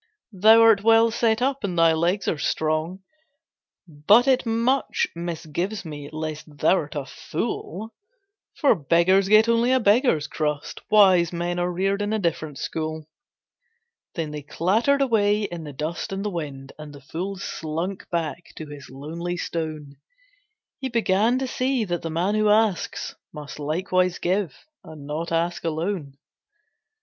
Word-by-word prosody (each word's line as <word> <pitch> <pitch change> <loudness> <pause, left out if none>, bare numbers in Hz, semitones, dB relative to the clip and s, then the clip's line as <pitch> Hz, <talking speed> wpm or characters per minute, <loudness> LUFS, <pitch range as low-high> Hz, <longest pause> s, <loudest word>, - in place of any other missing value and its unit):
"Thou 215 +4 +6
art 220 -3 +5
well 225 +1 +5
set 230 0 +1
up, 275 -1 -1
and 180 -4 -2
thy 165 -1 +5
legs 175 +5 0
are 155 - 0
strong, 155 +6 -1 0.8
But 185 - +4
it 260 -2 +2
much 235 +4 +1
misgives 170 +4 -4
me 145 -2 -7
lest 155 0 -5
thou'rt 155 -1 +1
a 145 -2 -3
fool; 195 - -5 0.6
For 285 - +4
beggars 185 +3 +2
get 215 +2 +6
only 235 +2 +3
a 260 - +4
beggar's 210 - +3
crust, 150 -1 -3
Wise 185 -5 +5
men 175 0 -2
are 175 0 0
reared 195 +3 0
in 205 +1 -1
a - - +1
different 160 -6 -2
school." 155 -1 -4 1.1
Then 160 -3 -3
they 150 0 -6
clattered 220 - +1
away 210 -4 +2
in 175 -5 -5
the 145 - -7
dust 155 +7 -4
and 195 +1 -4
the 210 - -1
wind, 140 -6 -6
And 150 -1 -9
the 140 - -13
fool 175 +8 -5
slunk 175 +1 -5
back 170 0 -4
to 155 - -7
his 145 -2 -11
lonely 165 +6 -5
stone; 155 -5 -5 0.8
He 265 -1 -3
began 230 0 +2
to 265 - -1
see 255 -1 0
that 175 -2 -3
the 165 - -4
man 175 +5 0
who 215 0 +2
asks 210 -4 +1 0.2
Must 150 0 -9
likewise 180 +4 0
give 180 -5 -2 0.2
and 150 -3 -11
not 155 +4 -4
ask 170 +1 -1
alone. 160 -3 -3
175 Hz, 155 wpm, -24 LUFS, 155-210 Hz, 1.1 s, Thou